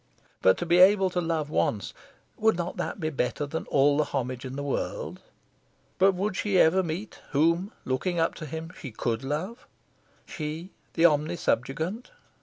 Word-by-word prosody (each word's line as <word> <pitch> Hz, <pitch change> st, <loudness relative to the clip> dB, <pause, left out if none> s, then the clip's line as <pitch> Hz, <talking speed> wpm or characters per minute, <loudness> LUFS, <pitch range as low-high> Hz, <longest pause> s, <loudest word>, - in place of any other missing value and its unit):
To 95 Hz, -, +4 dB
be 175 Hz, +1 st, +4 dB
able 190 Hz, 0 st, +6 dB
to 180 Hz, -, 0 dB
love 160 Hz, -3 st, -1 dB
once 100 Hz, -, 0 dB, 0.4 s
would 220 Hz, -3 st, +2 dB
not 175 Hz, +1 st, -3 dB
that -, -, -3 dB
be 155 Hz, -2 st, -1 dB
better 140 Hz, +1 st, -1 dB
than 160 Hz, +3 st, -4 dB
all 145 Hz, +1 st, +3 dB
the 155 Hz, -, +2 dB
homage 130 Hz, -2 st, -3 dB
in 130 Hz, 0 st, -6 dB
the 140 Hz, -, -4 dB
world? 140 Hz, -, -3 dB, 0.8 s
But 195 Hz, +1 st, +5 dB
would 190 Hz, +2 st, -2 dB
she 200 Hz, -2 st, +1 dB
ever 180 Hz, +2 st, +5 dB
meet 175 Hz, +3 st, -5 dB
whom, 170 Hz, +7 st, +2 dB
looking 165 Hz, +7 st, -1 dB
up 165 Hz, -, +2 dB
to 155 Hz, -, -5 dB
him, 160 Hz, +3 st, -6 dB
she 135 Hz, -, -7 dB
could 115 Hz, +1 st, -2 dB
love 175 Hz, -, -4 dB, 0.6 s
she, 160 Hz, +3 st, -5 dB, 0.2 s
the 165 Hz, -, +2 dB
omnisubjugant? 160 Hz, -, +1 dB
160 Hz, 165 wpm, -27 LUFS, 140-180 Hz, 0.8 s, able